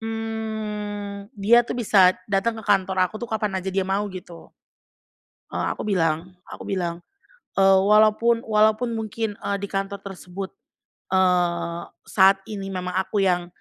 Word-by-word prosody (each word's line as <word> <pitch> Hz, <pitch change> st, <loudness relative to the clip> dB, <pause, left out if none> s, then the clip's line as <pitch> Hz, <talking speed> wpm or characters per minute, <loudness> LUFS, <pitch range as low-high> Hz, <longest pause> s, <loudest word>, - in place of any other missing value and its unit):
mmm, 215 Hz, -2 st, -5 dB
dia 215 Hz, +4 st, +5 dB
tuh 240 Hz, 0 st, -4 dB
bisa 195 Hz, -6 st, +4 dB
datang 205 Hz, +3 st, 0 dB
ke 220 Hz, -, -9 dB
kantor 190 Hz, -2 st, +2 dB
aku 215 Hz, +4 st, -6 dB
kapan 210 Hz, -3 st, -1 dB
aja 190 Hz, -, -5 dB
dia 190 Hz, 0 st, 0 dB
mau, 195 Hz, +2 st, -1 dB
gitu. 180 Hz, -3 st, -10 dB, 1.0 s
Eee, -, -, -2 dB
aku -, -, -6 dB
bilang 180 Hz, -2 st, -1 dB
aku -, -, -9 dB
bilang, 175 Hz, -2 st, -3 dB, 0.6 s
eee, 195 Hz, 0 st, +6 dB
"Walaupun 215 Hz, +3 st, +4 dB
walaupun 220 Hz, +2 st, +2 dB
mungkin, 220 Hz, -1 st, -3 dB
eee, 200 Hz, -, -1 dB
di 200 Hz, -, -4 dB
kantor 195 Hz, 0 st, -3 dB
tersebut, 190 Hz, 0 st, -7 dB, 0.6 s
eee, 170 Hz, -2 st, +1 dB, 0.2 s
saat 195 Hz, 0 st, +4 dB
ini 195 Hz, -2 st, -5 dB
memang 180 Hz, -1 st, -4 dB
aku 190 Hz, +2 st, 0 dB
yang 180 Hz, -2 st, +1 dB
195 Hz, 140 wpm, -23 LUFS, 185-215 Hz, 1.0 s, eee